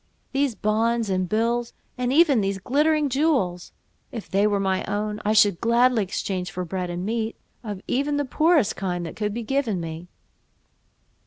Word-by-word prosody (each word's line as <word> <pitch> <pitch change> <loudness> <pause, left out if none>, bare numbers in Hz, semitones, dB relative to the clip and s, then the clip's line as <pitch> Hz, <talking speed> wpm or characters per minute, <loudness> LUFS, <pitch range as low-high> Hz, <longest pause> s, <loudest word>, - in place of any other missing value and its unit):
these 275 -3 0
bonds 225 +1 0
and 185 -1 0
bills, 235 +2 0 0.2
and 250 -1 -1
even 290 -5 +5
these 195 0 -1
glittering 300 - +2
jewels, 265 - 0 0.4
if 225 -4 -7
they 200 +2 +2
were 205 -1 +1
my 190 -1 0
own, 210 +1 -3
I 210 - +2
should 205 -4 +4
gladly 235 0 +3
exchange 185 -1 -3
for 180 -2 -4
bread 180 +1 -3
and 175 +1 -4
meat, 225 +1 -2 0.3
of 205 -4 -6
even 285 +3 0
the 290 - 0
poorest 305 - +2
kind 180 -2 -3
that 165 - -7
could 210 -1 -2
be 235 +3 -4
given 240 -5 0
me." 165 +1 -6
215 Hz, 170 wpm, -24 LUFS, 190-250 Hz, 0.4 s, even